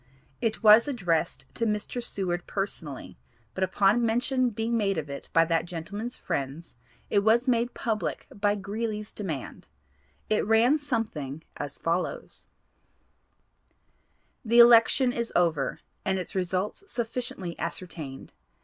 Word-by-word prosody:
It 225 0 -1
was 215 +4 +8
addressed 175 - -1
to 230 - -1
Mr. 210 +3 -2
Seward 180 -6 -2
personally, 165 - -5 0.3
but 190 - -1
upon 195 +5 +3
mention 245 +3 +2
being 225 +1 -2
made 200 -4 +1
of 150 -3 -4
it 140 - -7
by 165 0 +5
that 165 0 +1
gentlemen's 200 +8 -5
friends, 140 +5 -4 0.4
it 205 - +4
was 225 +5 +3
made 240 -1 +1
public 215 -9 -2
by 205 0 +1
Greeley's 210 +1 -4
demand. 160 - -6 0.6
It 215 - +2
ran 230 +7 +4
something 210 - -3
as 140 -1 -5
follows: 170 +2 -3 2.0
"The 235 0 +2
election 240 +2 +7
is 235 -1 -2
over, 165 -6 +1 0.2
and 190 0 0
its 180 - -4
results 185 - -2
sufficiently 235 -6 -4
ascertained. 165 -5 -6
205 Hz, 125 wpm, -27 LUFS, 170-230 Hz, 2.0 s, was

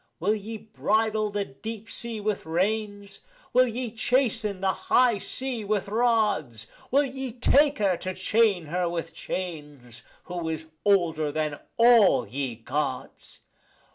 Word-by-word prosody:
Will 195 +6 +2
ye 220 +1 -5
bridle 215 0 0
the 205 -1 -2
deep 220 +10 -8
sea 230 -1 -3
with 210 -4 -2
reins, 205 +3 -2 0.3
will 255 +1 +5
ye 240 0 -4
chasten 225 -4 0
the 190 0 +1 0.2
high 245 -4 +4
sea 255 +1 -2
with 205 -1 -1
rods? 210 - +1 0.2
Will 280 +3 +4
ye 265 -1 -5
take 285 +5 +3
her 195 -5 +2
to 185 +1 -5
chain 200 -2 +2
her 175 +3 -1
with 165 -1 -4
chains, 150 -10 -6 0.2
who 175 -2 -4
is 160 0 -5
older 170 -7 +2
than 150 -1 -2 0.2
all 225 - +6
ye 130 +1 -3
Gods? 130 +3 -4
205 Hz, 140 wpm, -26 LUFS, 160-225 Hz, 0.3 s, all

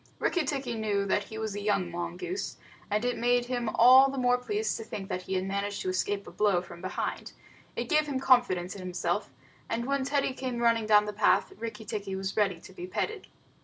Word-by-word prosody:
Rikki 350 -4 0
tikki 265 -3 -2
knew 210 -3 0
he 205 +2 -1
was 220 -2 -3
a 205 - -4
young 195 -4 0
mongoose, 175 - -4 0.3
and 210 +3 0
it 245 -1 -1
made 245 +1 +2
him 245 -2 -2
all 255 +5 +7
the 270 - -5
more 250 -1 +3
pleased 420 - -1
to 225 - -6
think 195 -3 -7
that 180 - -2
he 190 +1 -4
had 185 - 0
managed 200 +1 -2
to 185 - -1
escape 200 +2 -1
a - - -10
blow 205 -4 +2
from 170 -1 -11
behind. 185 - -4 0.4
It - - -3
gave 305 -2 +3
him 275 -3 -1
confidence 240 -9 +3
in 200 - -8
himself, 185 +2 -2 0.4
and 235 +1 -1
when 275 0 0
Teddy 275 -1 0
came 255 -2 -4
running 230 -2 +2
down 210 -1 +6
the 210 - -4
path, 205 0 +2
Rikki 225 0 -6
tikki 200 -2 -4
was 190 0 -3
ready 195 -5 +1
to 190 - -13
be 180 -1 -7
petted. 425 - -3
215 Hz, 215 wpm, -29 LUFS, 195-250 Hz, 0.4 s, all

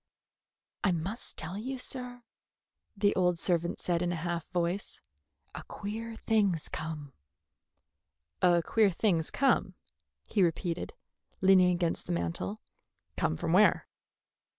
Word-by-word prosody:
"I 200 - +3
must 180 +7 -4
tell 180 +5 -4
you, 260 +4 -4
sir," 250 -1 -2 0.7
the 205 0 +2
old 180 -2 +2
servant 170 0 0
said 175 -1 0
in 175 -1 0
a - - -1
half 170 0 -3
voice, 180 +2 -2 0.5
"a - - -6
queer 225 +3 -6
thing's 205 -8 +1
come." 150 -3 -6 1.3
"A 175 -2 +4
queer 220 +2 +3
thing's 170 -3 +1
come," 275 0 +2 0.5
he 210 - +1
repeated, 170 0 0 0.5
leaning 185 -1 +6
against 175 -2 -1
the - - -1
mantel. 85 +4 -2 0.6
"Come 80 - 0
from 165 - -1
where?" 205 +3 +5
180 Hz, 125 wpm, -30 LUFS, 165-205 Hz, 1.3 s, leaning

